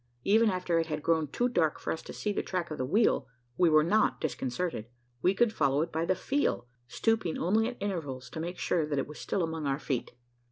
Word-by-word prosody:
Even 220 Hz, +2 st, +4 dB
after 180 Hz, -3 st, 0 dB
it 165 Hz, -, -1 dB
had 150 Hz, -2 st, -3 dB
grown 160 Hz, -2 st, +2 dB
too 240 Hz, -, 0 dB
dark 165 Hz, -11 st, +1 dB
for -, -, -2 dB
us 160 Hz, -, -6 dB
to -, -, -9 dB
see 210 Hz, -, -2 dB
the -, -, 0 dB
track 175 Hz, -3 st, -3 dB
of 155 Hz, -, -5 dB
the 130 Hz, -, 0 dB
wheel, 215 Hz, -, +2 dB, 0.3 s
we 175 Hz, -2 st, +4 dB
were 155 Hz, -1 st, +5 dB
not 210 Hz, +7 st, +2 dB
disconcerted. 135 Hz, -3 st, -3 dB, 0.3 s
We 185 Hz, +2 st, +3 dB
could 235 Hz, 0 st, +3 dB
follow 140 Hz, -2 st, +2 dB
it -, -, -6 dB
by 160 Hz, +1 st, -1 dB
the 185 Hz, -, +2 dB
feel 275 Hz, -, 0 dB, 0.2 s
stooping 220 Hz, -, 0 dB
only 220 Hz, +6 st, +2 dB
at 245 Hz, -, -5 dB
intervals 145 Hz, -11 st, -4 dB
to -, -, -6 dB
make 175 Hz, +3 st, -4 dB
sure 160 Hz, -4 st, 0 dB
that 145 Hz, -2 st, -2 dB
it 135 Hz, -, 0 dB
was 150 Hz, -, -10 dB
still 185 Hz, -, -1 dB
among 160 Hz, -2 st, -3 dB
our 135 Hz, 0 st, +1 dB
feet. 135 Hz, -4 st, -3 dB
165 Hz, 235 wpm, -30 LUFS, 150-200 Hz, 0.3 s, were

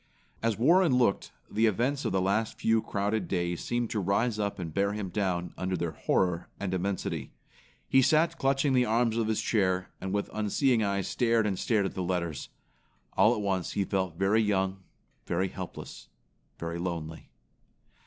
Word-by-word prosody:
As 115 Hz, -2 st, 0 dB
Warren 165 Hz, -, +4 dB
looked, 120 Hz, -6 st, +1 dB, 0.2 s
the 110 Hz, +2 st, +2 dB
events 125 Hz, +7 st, 0 dB
of -, -, 0 dB
the 95 Hz, -, +1 dB
last 110 Hz, +4 st, 0 dB
few 115 Hz, 0 st, +3 dB
crowded 105 Hz, 0 st, -1 dB
days 85 Hz, -2 st, -1 dB
seemed 120 Hz, -1 st, -1 dB
to 110 Hz, -, 0 dB
rise 105 Hz, +4 st, +1 dB
up 100 Hz, -1 st, -1 dB
and 85 Hz, -4 st, -5 dB
bear 100 Hz, +2 st, +1 dB
him 105 Hz, -3 st, -4 dB
down 90 Hz, -3 st, -1 dB
under 95 Hz, 0 st, -1 dB
their 85 Hz, -1 st, -2 dB
horror 90 Hz, +2 st, 0 dB
and 95 Hz, -2 st, -2 dB
immensity. 95 Hz, +1 st, -2 dB, 0.5 s
He 135 Hz, -, +5 dB
sat 160 Hz, +5 st, +3 dB
clutching 135 Hz, +1 st, +2 dB
the 125 Hz, -1 st, +4 dB
arms 115 Hz, 0 st, +1 dB
of 115 Hz, -2 st, 0 dB
his 110 Hz, -1 st, 0 dB
chair, 95 Hz, -4 st, 0 dB
and 95 Hz, -, -3 dB
with 100 Hz, +1 st, -1 dB
unseeing 110 Hz, +3 st, +2 dB
eyes 100 Hz, -2 st, 0 dB
stared 115 Hz, -2 st, +2 dB
and 95 Hz, -3 st, -1 dB
stared 105 Hz, -4 st, +1 dB
at 95 Hz, -, -3 dB
the 95 Hz, -, -3 dB
letters. 85 Hz, -5 st, -2 dB, 0.6 s
All 110 Hz, +5 st, +4 dB
at 105 Hz, -, -3 dB
once 95 Hz, -3 st, -1 dB
he 100 Hz, -, +1 dB
felt 95 Hz, -4 st, -2 dB
very 100 Hz, +4 st, +3 dB
young, 95 Hz, -2 st, 0 dB, 0.5 s
very 95 Hz, +2 st, 0 dB
helpless, -, -, -8 dB, 0.5 s
very 85 Hz, 0 st, -4 dB
lonely. 85 Hz, -3 st, -5 dB
100 Hz, 175 wpm, -29 LUFS, 95-115 Hz, 0.6 s, He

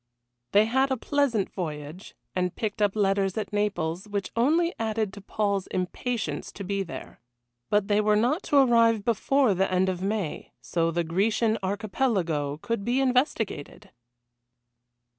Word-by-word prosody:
They 205 Hz, +2 st, +5 dB
had 265 Hz, +4 st, +2 dB
a 265 Hz, -, 0 dB
pleasant 260 Hz, -6 st, 0 dB
voyage, 155 Hz, -1 st, -6 dB, 0.2 s
and 180 Hz, -1 st, -1 dB
picked 215 Hz, -1 st, -3 dB
up 205 Hz, -1 st, +2 dB
letters 195 Hz, -2 st, +1 dB
at 215 Hz, -, -3 dB
Naples, 190 Hz, -3 st, -1 dB
which 205 Hz, -1 st, -3 dB
only 320 Hz, +9 st, +2 dB
added 220 Hz, -2 st, -1 dB
to 200 Hz, -, -9 dB
Paul's 200 Hz, -1 st, -1 dB
impatience 185 Hz, -, -3 dB
to 200 Hz, -, -7 dB
be 200 Hz, +1 st, -1 dB
there. 135 Hz, -11 st, -8 dB, 0.5 s
But 205 Hz, -1 st, +2 dB
they 205 Hz, 0 st, +3 dB
were 210 Hz, 0 st, +3 dB
not 245 Hz, -, +2 dB
to 290 Hz, -, +4 dB
arrive 230 Hz, -5 st, +4 dB
before 245 Hz, +1 st, +2 dB
the 190 Hz, +1 st, 0 dB
end 185 Hz, +1 st, +2 dB
of 185 Hz, -1 st, -3 dB
May, 195 Hz, -4 st, -3 dB
so 165 Hz, -1 st, 0 dB
the 170 Hz, +1 st, 0 dB
Grecian 215 Hz, +6 st, +1 dB
Archipelago 190 Hz, -, -1 dB
could 230 Hz, -3 st, -2 dB
be 245 Hz, +5 st, +1 dB
investigated. 250 Hz, -, -1 dB
205 Hz, 150 wpm, -26 LUFS, 185-230 Hz, 0.5 s, They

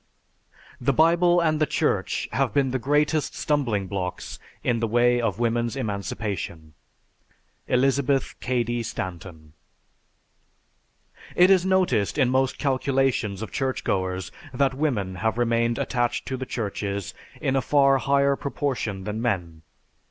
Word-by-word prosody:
The 130 Hz, +2 st, +1 dB
Bible 175 Hz, +4 st, +4 dB
and 155 Hz, -2 st, +1 dB
the 155 Hz, -, +3 dB
Church -, -, 0 dB
have 135 Hz, -1 st, 0 dB
been 135 Hz, -2 st, +2 dB
the 130 Hz, -, -1 dB
greatest 150 Hz, +3 st, +1 dB
stumbling 120 Hz, -10 st, 0 dB
blocks 95 Hz, -2 st, -5 dB, 0.2 s
in 120 Hz, -1 st, +1 dB
the 115 Hz, -, 0 dB
way 120 Hz, +2 st, +3 dB
of 110 Hz, -5 st, -1 dB
women's 120 Hz, +1 st, 0 dB
emancipation. 100 Hz, -, -4 dB, 0.9 s
ELIZABETH 135 Hz, +1 st, +1 dB
CADY 120 Hz, -1 st, -1 dB
STANTON. 85 Hz, -7 st, -7 dB, 1.8 s
It 180 Hz, +2 st, +6 dB
is 190 Hz, -1 st, +4 dB
noticed 185 Hz, -, +1 dB
in 130 Hz, -4 st, +3 dB
most 130 Hz, 0 st, +1 dB
calculations 130 Hz, -7 st, 0 dB
of 110 Hz, -, -7 dB
churchgoers 95 Hz, -8 st, -2 dB, 0.2 s
that 135 Hz, +1 st, +1 dB
women 125 Hz, -10 st, -1 dB
have 110 Hz, +2 st, -1 dB
remained 115 Hz, 0 st, +1 dB
attached 120 Hz, -1 st, -1 dB
to 130 Hz, -, -2 dB
the 130 Hz, 0 st, -5 dB
churches 100 Hz, -3 st, -3 dB, 0.3 s
in 135 Hz, -, 0 dB
a 135 Hz, -, +2 dB
far 135 Hz, 0 st, +4 dB
higher 140 Hz, +1 st, +2 dB
proportion 130 Hz, -9 st, -3 dB
than 105 Hz, +2 st, -4 dB
men. 90 Hz, -9 st, -2 dB
120 Hz, 130 wpm, -25 LUFS, 105-140 Hz, 1.8 s, It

